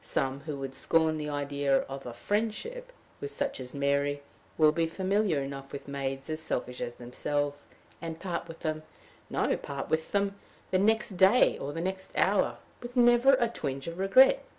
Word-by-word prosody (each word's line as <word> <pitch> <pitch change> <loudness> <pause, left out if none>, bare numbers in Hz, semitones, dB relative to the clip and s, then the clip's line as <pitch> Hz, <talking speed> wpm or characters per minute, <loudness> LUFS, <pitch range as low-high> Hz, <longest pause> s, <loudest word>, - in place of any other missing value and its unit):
Some, 135 -1 -1
who 145 0 -5
would 135 -1 -5
scorn 160 +3 +2
the 150 -1 -3
idea 140 -1 +1
of 135 -1 -7
a 120 - -6
friendship 230 - -2 0.3
with 425 - -4
such 285 - -1
as 125 0 -7
Mary, 140 0 +1 0.3
will 155 -1 +6
be 165 +1 +1
familiar 190 -3 +1
enough 135 0 -7
with 140 - -7
maids 135 -1 -3
as 155 0 -3
selfish 125 -5 -3
as 120 - -4
themselves, 145 +4 -3 0.3
and 165 -1 -5
part 180 -3 -3
from 165 - -8
them 155 0 -2 0.5
no - - +1
part 140 -1 -5
with 160 0 0
them, 200 0 0 0.3
the 185 - +3
next 215 -1 +2
day, 195 +7 +6
or 140 - -4
the 165 +3 -4
next 190 +1 -4
hour, - - +3 0.2
with 245 +1 -7
never 240 +2 +6
a 240 -2 +2
twinge 140 - -4
of 170 +2 -5
regret. 260 - +6
155 Hz, 180 wpm, -29 LUFS, 140-200 Hz, 0.5 s, will